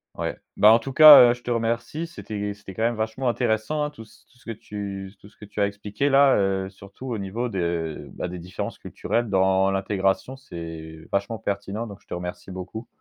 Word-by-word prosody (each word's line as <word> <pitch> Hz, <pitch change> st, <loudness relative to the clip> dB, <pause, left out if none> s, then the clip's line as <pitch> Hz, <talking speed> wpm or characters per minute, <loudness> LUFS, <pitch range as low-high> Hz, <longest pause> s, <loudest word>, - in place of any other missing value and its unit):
Ouais. -, -, -3 dB, 0.2 s
Bah, 105 Hz, -, +7 dB
en 115 Hz, -, +7 dB
tout 135 Hz, +3 st, -6 dB
cas, 145 Hz, -5 st, +10 dB
heu, -, -, +2 dB
je 125 Hz, -, -12 dB
te 120 Hz, -, -7 dB
remercie. 120 Hz, +6 st, -1 dB
C'était 105 Hz, -, -5 dB
c'était 100 Hz, -2 st, -12 dB
quand 110 Hz, -, -2 dB
même 120 Hz, +1 st, +1 dB
vachement 110 Hz, +4 st, -2 dB
intéressant, 120 Hz, +5 st, 0 dB
hein, 150 Hz, -, -1 dB
tout 145 Hz, -7 st, -12 dB
ce 110 Hz, -, -22 dB
tout 125 Hz, -, -26 dB
ce -, -, -24 dB
que 115 Hz, -, -5 dB
tu 100 Hz, -3 st, -7 dB
tout -, -, -15 dB
ce 105 Hz, -, -21 dB
que 105 Hz, -, -12 dB
tu 105 Hz, +1 st, -8 dB
as 100 Hz, -, +4 dB
expliqué 105 Hz, +5 st, -3 dB
là. 135 Hz, 0 st, +5 dB
Heu, 95 Hz, -1 st, 0 dB
surtout 100 Hz, +6 st, -12 dB
au 120 Hz, -3 st, -2 dB
niveau 105 Hz, +5 st, -3 dB
de, 85 Hz, -5 st, -3 dB
bah, -, -, -4 dB
des 90 Hz, 0 st, -6 dB
différences 90 Hz, +3 st, -6 dB
culturelles 120 Hz, 0 st, -2 dB
dans 95 Hz, 0 st, +3 dB
l'intégration. 95 Hz, +5 st, -1 dB
C'est 80 Hz, -, -9 dB
vachement 100 Hz, +3 st, -1 dB
pertinent, 100 Hz, +3 st, -3 dB
donc 100 Hz, -1 st, -10 dB
je -, -, -30 dB
te -, -, -7 dB
remercie 90 Hz, +2 st, -6 dB
beaucoup. 95 Hz, +5 st, -7 dB
105 Hz, 220 wpm, -24 LUFS, 95-120 Hz, 0.2 s, cas